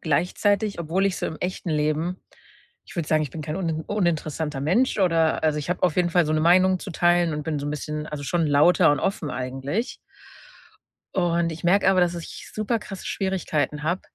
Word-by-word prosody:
gleichzeitig 200 +6 0
obwohl 175 +4 0
ich 190 - -1
so - - -2
im 160 - -5
echten 180 -2 -3
Leben 155 +4 -1 0.6
ich - - -14
würde 165 - -1
sagen, 155 0 +3
ich 145 - -4
bin 155 - -6
kein 155 +2 -4
unin 165 -4 -2
uninteressanter 160 -7 -1
Mensch 205 - +1
oder 165 -4 +2
also, 155 -1 +2
ich 150 - -4
habe 180 - -2
auf 180 -2 +1
jeden 175 -1 +2
Fall 175 -2 +3
so 155 - 0
'ne 155 - +1
Meinung 185 +3 +4
zu 195 - -7
teilen 175 0 +2
und 150 -1 -4
bin 155 -2 -2
so 145 - -4
'n - - -2
bisschen, 150 +1 -4
also, 145 -1 -5
schon 170 +3 0
lauter 150 +3 +5
und 145 - +1
offen 190 -6 -2
eigentlich. 135 - -3 1.2
Und 170 -2 +1
ich 160 - -9
merke 190 +2 +4
aber, 185 -1 +3
dass 175 0 +2
ich 170 - -8
super 215 +2 0
krasse 195 -2 -9
Schwierigkeiten 160 -6 -1
habe, 175 +4 0
170 Hz, 210 wpm, -24 LUFS, 150-185 Hz, 1.2 s, lauter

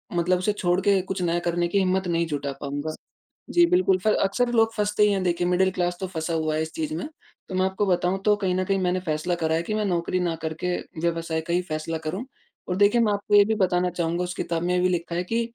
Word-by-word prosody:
मतलब 175 +1 +2
उसे 185 +3 +1
छोड़ 180 -2 +1
के 200 -1 +3
कुछ 190 0 -4
नया 175 -1 +1
करने 175 0 0
की 200 - -1
हिम्मत 190 0 +1
नहीं 170 -1 +1
जुटा 145 -2 -3
पाऊँगा। 145 +2 -4 0.5
जी, 345 0 +5
बिल्कुल 340 - +3
पर 215 - +4
अक्सर 240 +5 +1
लोग 225 -1 +3
फँसते 210 0 +1
ही 210 - +4
हैं, 195 - 0
देखिए 175 0 0
मिडल 185 +1 +3
क्लास 180 -1 -1
तो 190 - -3
फँसा 165 -2 -3
हुआ 155 -1 0
है 155 - 0
इस 160 - -4
चीज़ 310 -1 -3
में। 295 - -4 0.4
तो 185 - -4
मैं 185 - +2
आपको 190 +2 0
बताऊँ, 180 0 +1
तो 210 -1 +5
कहीं 190 -3 -1
न 185 - +1
कहीं 195 +1 +1
मैंने 180 0 0
फ़ैसला 155 +3 -1
करा 160 -1 0
हैं 165 - 0
कि 215 - -3
मैं 215 -1 0
नौकरी 175 0 0
ना 175 -2 0
करके 160 +3 -2 0.3
व्यवसाय 165 -1 -1
का 170 +1 -4
ही 180 - +2
फ़ैसला 155 +1 -3
करूँ। 160 +9 -4 0.4
और 180 - -1
देखिए 205 +4 +4
मैं 215 -2 +2
आपको 205 +1 0
ये 205 - +8
भी 220 +1 0
बताना 180 -2 +1
चाहूँगा 170 0 -1
उस 180 - -4
किताब 165 0 -2
में 180 +1 0
ये 180 - +2
भी 185 - +3
लिखा 170 -1 -2
है 175 - 0
कि 230 +1 +2
180 Hz, 260 wpm, -25 LUFS, 170-200 Hz, 0.5 s, ये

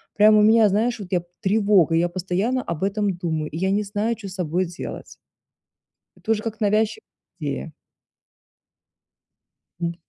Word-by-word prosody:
Прям 215 +1 +6
у - - +6
меня, 220 0 +6
знаешь, 225 +4 0
вот 195 -3 -8
я 175 -2 +1 0.2
тревога, 200 -5 +3
я 175 +1 +2
постоянно 190 +8 -1
об 170 0 -4
этом 200 -1 0
думаю, 160 -3 -2
и 160 - -5
я 190 +2 0
не 210 +1 +1
знаю, 210 +3 -1
чё 210 -3 -9
с 185 - -9
собой 180 0 -1
делать. 175 +1 -7 1.1
Это 225 - -7
уже 215 -1 +2
как 225 -1 -5
навязчи 215 - +1 0.4
идея. - - -4 2.1
М. 170 0 -1
200 Hz, 155 wpm, -23 LUFS, 175-215 Hz, 2.1 s, Прям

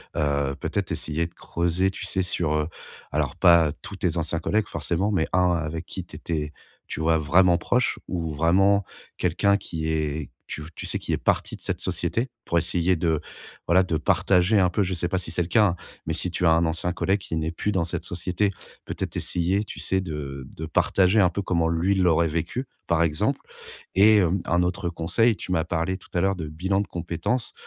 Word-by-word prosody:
Heu, 70 -2 0
peut-être - - -2
essayer 80 +2 -1
de 85 - -20
creuser, 85 +3 0
tu - - -6
sais 95 -1 0
sur, 85 -3 0
heu, 75 0 0 0.4
alors, 75 -1 -1
pas 85 -4 +5
tous - - -7
tes - - 0
anciens - - 0
collègues, 110 0 0
forcément, 95 +5 -1
mais 85 -5 +1
un 90 -1 +4
avec 80 -1 -2
qui 95 - -6
tu - - -13
étais, 75 -3 -3 0.4
tu - - -5
vois 80 0 +3
vraiment 85 +3 +4
proche 125 +8 0
ou 80 -3 -3
vraiment 95 +6 +3 0.3
quelqu'un 100 -1 +2
qui 80 -5 -4
est, 75 -1 -2 0.2
tu 75 - -6
v 75 - -10
tu - - -5
sais, - - +1
qui - - -3
est - - +1
parti - - 0
de - - -22
cette - - -3
société 120 +3 -1 0.2
pour 85 - 0
essayer 85 +2 +2
de, 80 -2 0 0.5
voilà, 90 +3 +5
de 85 -3 -1
partager 95 +5 +3
un 90 -2 +4
peu. 105 - 0
Je 95 0 -2
sais 85 0 +1
pas 95 +1 0
si 90 - -5
c'est 85 +1 0
le - - -6
cas, 110 +3 +4
hein, 85 - 0 0.3
mais - - 0
si 90 - -1
tu 90 - -1
as - - +6
un 85 +1 +4
ancien 80 +2 -1
collègue 95 +2 +1
qui 85 - -5
n'est 80 0 -1
plus 95 +5 -2
dans 95 -4 +1
cette 85 - -3
société, 90 +3 -1 0.4
peut - - -5
être - - -4
essayer, 90 +4 0
tu - - -9
sais 95 0 0
de 70 -6 -6
de 80 - -7
partager 95 +4 +3
un 90 -3 +5
peu 100 +3 -3
comment 85 -3 +1
lui, 85 +4 +1
il 95 - +1
l'aurait 85 -2 +3
vécu, 85 - -2 0.2
par 85 -1 +3
exemple. 75 -2 0 0.5
Et 105 +3 +6
hem, 95 0 +2
un 85 +1 +2
autre 90 0 -1
conseil, 90 +7 +2
tu - - -7
m'as 80 -3 +2
parlé 85 +2 -1
tout 95 - -18
à 85 - +2
l'heure 95 +1 +2
de 80 -3 -5
bilan 95 +6 -1
de 105 - -4
compétences. 90 +8 -2
85 Hz, 220 wpm, -25 LUFS, 80-95 Hz, 0.5 s, as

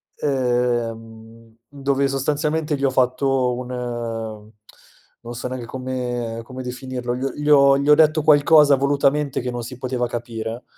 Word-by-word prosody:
ehm, 115 -4 -2
dove 140 -1 -1
sostanzialmente 150 +2 -1
gli 140 - -1
ho 135 - +3
fatto 130 0 +1
un, 125 0 -6
ehm, 115 -3 -5 0.7
non 120 +1 -7
so 120 - -4
neanche 130 -2 -5
come 125 -2 -4
come 130 +2 -8
definirlo, 125 -1 -5
gl 135 +2 -3
gli 150 0 -3
ho 140 -1 +6
gli 140 +1 -1
ho 150 - +8
detto 155 0 +3
qualcosa 150 -1 +6
volutamente 140 +1 +1
che 125 0 -3
non 120 0 -4
si 125 +1 -8
poteva 125 -1 -2
capire, 115 0 -5
130 Hz, 150 wpm, -21 LUFS, 120-140 Hz, 0.7 s, ho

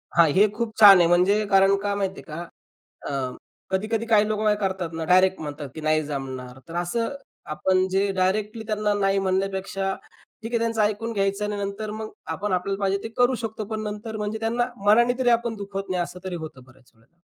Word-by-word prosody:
हां, 170 -2 +6
हे 205 +3 +5
खूप 225 -1 -3
छान 200 -3 +10
आहे, 170 - +5
म्हणजे 185 +5 +3
कारण, 195 0 +5
का 205 0 -1
माहिती 195 -1 -3
आहे - - -19
का? 165 - -5 0.7
अ, 145 - -3 0.6
कधी-कधी 215 +4 -1
काही 215 -2 +4
लोक 215 -1 -1 0.2
करतात 190 -4 -2
ना, 160 0 -3
डायरेक्ट 185 +2 +4
म्हणतात 145 -2 -6
की 160 - -7
नाही 155 0 +2
जमणार. 130 -3 -6
तर 165 - -9
असं 230 +9 -1 0.4
आपण 185 +4 +2
जे 195 +1 +1
डायरेक्टली 210 +4 -1
त्यांना 210 -1 0
नाही 195 -1 +1
म्हणण्यापेक्षा, 195 0 -1 0.5
ठीक 225 - -5
आहे 235 - +2
त्यांचं 230 -1 -1
ऐकून 215 +2 -1
घ्यायचं 195 0 0
आणि 210 0 -2
नंतर 200 +2 -5
मग 215 0 -6 0.2
आपण 205 0 -3
आपल्याला 195 +2 -1
पाहिजे 195 0 +1
ते - - -3
करू 245 +1 +3
शकतो. 220 -1 -4
पण 215 +1 -4
नंतर 215 +1 -5
म्हणजे 210 +1 -3
त्यांना 230 +2 0 0.2
मनाने 240 +4 +4
तरी 245 -2 +3
आपण 235 0 +1
दुखवत 200 -1 -6
नाही. 180 -1 0
असं 180 +1 -7
तरी 185 - -4
होतं 135 -5 -10
बऱ्याच 130 0 -22
वेळेला. 115 +10 -31
195 Hz, 200 wpm, -24 LUFS, 180-215 Hz, 0.7 s, छान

